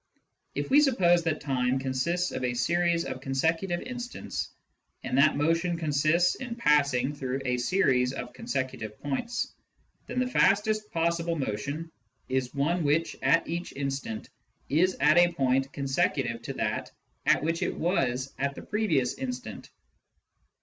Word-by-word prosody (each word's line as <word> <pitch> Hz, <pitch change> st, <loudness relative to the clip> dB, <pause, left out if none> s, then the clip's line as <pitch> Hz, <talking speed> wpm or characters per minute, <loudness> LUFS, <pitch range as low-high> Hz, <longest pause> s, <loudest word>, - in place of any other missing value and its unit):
If -, -, -3 dB
we 290 Hz, +2 st, +7 dB
suppose 180 Hz, -12 st, +4 dB
that 160 Hz, -2 st, 0 dB
time 130 Hz, -2 st, +1 dB
consists 135 Hz, +7 st, -1 dB
of -, -, -4 dB
a 120 Hz, -1 st, 0 dB
series 170 Hz, +6 st, +1 dB
of 130 Hz, 0 st, -5 dB
consecutive 165 Hz, +7 st, 0 dB
instants, 245 Hz, -1 st, -5 dB, 0.5 s
and -, -, -2 dB
that 155 Hz, +1 st, +5 dB
motion 165 Hz, +3 st, +1 dB
consists 155 Hz, +3 st, +2 dB
in 245 Hz, -3 st, -6 dB
passing 145 Hz, -, +2 dB
through 135 Hz, -1 st, -3 dB
a 125 Hz, -1 st, +1 dB
series 125 Hz, -3 st, +2 dB
of -, -, -6 dB
con 230 Hz, -, -11 dB
secutive 130 Hz, -, -3 dB
points, 145 Hz, -, -3 dB, 0.5 s
then -, -, -6 dB
the 255 Hz, -, +2 dB
fastest 215 Hz, -2 st, +2 dB
possible 170 Hz, 0 st, 0 dB
motion 140 Hz, +6 st, -3 dB, 0.4 s
is 130 Hz, -1 st, 0 dB
one 165 Hz, +5 st, +1 dB
which, 155 Hz, +3 st, +1 dB
at 165 Hz, -, +3 dB
each 170 Hz, +2 st, -4 dB
instant, 135 Hz, -5 st, -4 dB, 0.4 s
is 180 Hz, +6 st, +2 dB
at 150 Hz, +4 st, +5 dB
a 175 Hz, 0 st, +4 dB
point 135 Hz, -2 st, +1 dB
consecutive 135 Hz, -4 st, 0 dB
to -, -, -5 dB
that -, -, -2 dB, 0.4 s
at -, -, +4 dB
which 165 Hz, +1 st, -1 dB
it -, -, -1 dB
was 135 Hz, -7 st, 0 dB
at 140 Hz, 0 st, -1 dB
the -, -, -8 dB
previous 165 Hz, -, +1 dB
instant. 125 Hz, -4 st, -5 dB
150 Hz, 150 wpm, -28 LUFS, 130-175 Hz, 0.5 s, we